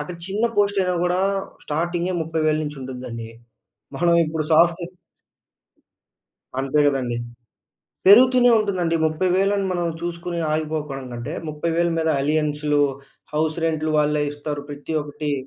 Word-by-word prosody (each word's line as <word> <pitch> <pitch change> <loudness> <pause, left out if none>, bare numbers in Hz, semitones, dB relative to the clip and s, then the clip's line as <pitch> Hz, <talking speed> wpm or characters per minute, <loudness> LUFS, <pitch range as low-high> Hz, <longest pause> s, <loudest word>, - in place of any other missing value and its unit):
అక్కడ 170 +4 -6
చిన్న 200 +4 -1
పోస్ట్ 205 -1 +2
అయినా 180 -1 +1
గూడా 180 +1 +1 0.4
స్టార్టింగే 170 +4 -1
30,000 155 -1 0
నుంచి 150 0 -6
ఉంటుందండి. 125 -3 -7 0.7
మనం 170 0 +3
ఇప్పుడు 155 0 -2
సాఫ్ట్‌వేర్ 170 +2 +3 1.7
అంతే 135 +2 +1
గదండీ. 125 -4 0 0.9
పెరుగుతూనే 245 +4 +7
ఉంటుందండి. 185 -6 0
30000 185 +5 +1
మనం 175 -1 -1
చూసుకొని 170 0 -4
ఆగిపోకపోవడం 150 -3 -3
కంటే, 120 +6 -5 0.2
30000 170 +3 0
మీద 160 0 0
అలియన్స్‌లు, 150 0 +1 0.5
హౌస్ 155 +1 0
రెంట్‌లు 155 -1 0
వాళ్ళే 150 0 +2
ఇస్తారు. 145 0 -5
ప్రతి 145 +2 -6
ఒక్కటి. 145 0 -4
160 Hz, 115 wpm, -22 LUFS, 150-175 Hz, 1.7 s, పెరుగుతూనే